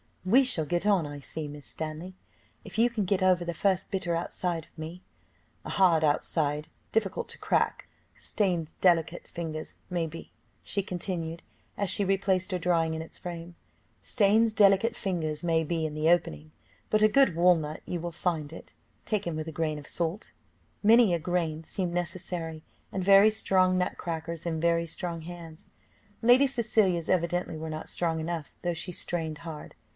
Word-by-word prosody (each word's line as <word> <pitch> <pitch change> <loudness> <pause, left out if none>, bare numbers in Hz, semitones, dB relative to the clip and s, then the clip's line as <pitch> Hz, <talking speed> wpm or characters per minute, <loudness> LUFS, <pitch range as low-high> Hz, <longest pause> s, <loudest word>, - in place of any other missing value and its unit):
"We 235 +9 +6
shall 215 -12 0
get 175 +5 -1
on, 195 -6 +3
I 145 0 -7
see, 150 +2 -5
Miss 145 -1 -9
Stanley, 160 +4 -6 0.5
if - - -9
you 235 +2 +5
can 215 -4 -1
get 190 +1 +1
over 185 -2 +4
the 170 -1 -3
first 190 +1 +1
bitter 180 -4 -1
outside 170 -1 -2
of - - -30
me; 165 +3 -7 0.6
a - - -5
hard 175 -5 +4
outside, 150 0 +1 0.2
difficult 210 -4 0
to - - -6
crack - - 0 0.3
stains 175 -6 -1
delicate 170 -2 +2
fingers, 160 -2 -5 0.2
may 175 -2 0
be," 165 +1 -10 0.3
she 200 - -1
continued, 175 -3 -4 0.4
as 200 -2 0
she 200 - +2
replaced 190 0 +1
her 185 - 0
drawing 165 -2 +1
in 160 - -3
its 160 - -8
frame 170 -1 -7 0.5
"stains 220 +1 +3
delicate 205 +2 +4
fingers, 165 -7 -2
may 165 -1 +2
be, 160 0 -1
in 150 - -7
the 155 +1 +2
opening, 80 - +1 0.4
but 215 0 +4
a - - +8
good 265 -4 +4
walnut 165 -3 +3
you 175 - -3
will 170 +1 -4
find 160 -3 -2
it, - - -11 0.3
taken 200 -6 -1
with 155 0 -4
a - - -4
grain 155 -1 -1
of 145 - -12
salt." 170 +5 -2 0.5
Many 225 -2 +6
a 170 - +1
grain 165 -2 -1
seemed 175 +1 -3
necessary, 175 -2 -4 0.3
and 190 - -2
very 200 +2 +7
strong 185 -4 +2
nut 180 - -1
crackers 165 0 -4
in 160 -1 -1
very 170 0 +2
strong 170 0 -4
hands. 165 -1 -10 0.5
Lady 250 +4 +6
Cecilia's 215 -9 +1
evidently 175 -2 0
were 160 +1 -5
not 155 0 -5
strong 165 -2 -1
enough, 160 -1 -4
though 175 -1 0
she 175 +2 -2
strained 160 -3 -3
hard. 160 -3 -8
175 Hz, 175 wpm, -28 LUFS, 160-190 Hz, 0.6 s, a